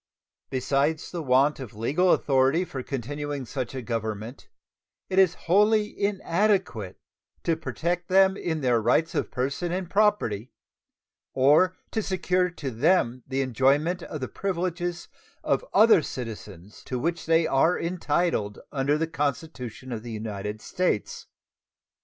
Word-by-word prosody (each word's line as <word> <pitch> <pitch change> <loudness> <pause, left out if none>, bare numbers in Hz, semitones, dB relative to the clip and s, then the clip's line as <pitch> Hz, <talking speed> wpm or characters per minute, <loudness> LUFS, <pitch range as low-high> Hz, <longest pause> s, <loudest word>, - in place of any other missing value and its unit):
Besides 140 +4 0
the 175 - -4
want 135 +1 +3
of 125 -6 -8
legal 150 - +2
authority 135 +5 +3
for 135 -6 -6
continuing 145 +2 -4
such 130 0 -5
a 130 - -4
government, 110 +1 -4 0.6
it 190 - +3
is 185 -2 +5
wholly 210 +4 +3
inadequate 195 - 0 0.5
to 165 - +1
protect 170 +2 -3
them 190 0 +5
in 160 -5 -3
their 120 -3 +2
rights 140 +9 +2
of - - -1
person 140 +7 -2
and 180 0 -2
property, 170 - +1 0.8
or 150 +8 +4 0.2
to 220 - 0
secure 185 -2 0
to 145 -6 -6
them 125 0 +2
the 135 0 -1
enjoyment 140 +8 +2
of 155 -3 -7
the 130 - -2
privileges 175 -2 -3 0.4
of - - +1
other 220 -5 +6
citizens, 105 - -8
to 130 - -3
which 165 +6 -2
they 165 0 +4
are 160 +6 +2
entitled 165 - -1
under 140 +1 +1
the 165 - 0
Constitution 140 -5 -4
of 115 -2 -4
the 120 +1 -8
United 105 -1 -5
States. 180 - -2
145 Hz, 135 wpm, -26 LUFS, 125-180 Hz, 0.8 s, other